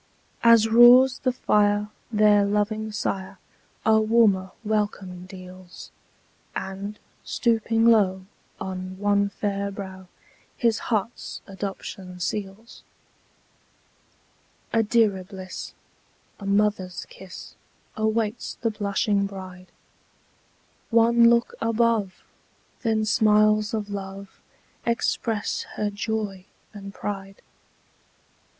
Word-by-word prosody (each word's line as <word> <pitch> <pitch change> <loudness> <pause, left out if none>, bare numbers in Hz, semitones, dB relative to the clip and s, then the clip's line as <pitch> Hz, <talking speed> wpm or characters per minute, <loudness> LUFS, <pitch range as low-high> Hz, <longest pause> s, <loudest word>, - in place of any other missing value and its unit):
As 230 -1 +6
roars 245 +3 +7
the 255 - +1
fire, 210 -3 +2 0.2
their 210 -1 +5
loving 210 +2 -1
sire 195 -2 -3 0.5
A 220 0 +5
warmer 215 -4 +3
welcome 205 -4 -2
deals; 185 -1 -12 0.6
And, 195 +2 -5 0.3
stooping 225 -1 +1
low, 195 -5 +4 0.3
on 185 0 -5
one 200 0 +2
fair 200 0 -2
brow 190 -2 -8 0.5
His 230 -3 +2
heart's 225 +1 -2
adoption 190 -2 -7
seals. 200 +4 -5 1.9
A 225 - +4
dearer 210 -4 +2
bliss, 185 0 -8 0.6
a 200 - -7
mother's 200 -3 0
kiss, 190 -2 -11 0.4
Awaits 220 +1 -1
the 230 - -1
blushing 200 -1 0
bride: 185 -2 -10 1.2
One 235 0 +5
look 235 0 +2
above! 225 -4 +1 0.6
then 220 -2 +1
smiles 215 0 +3
of 210 -2 -3
love 195 0 -7 0.4
Express 230 -2 -1
her 210 -1 -1
joy 205 -3 -3 0.3
and 200 -1 -8
pride. 195 -1 -6
205 Hz, 90 wpm, -25 LUFS, 195-220 Hz, 1.9 s, roars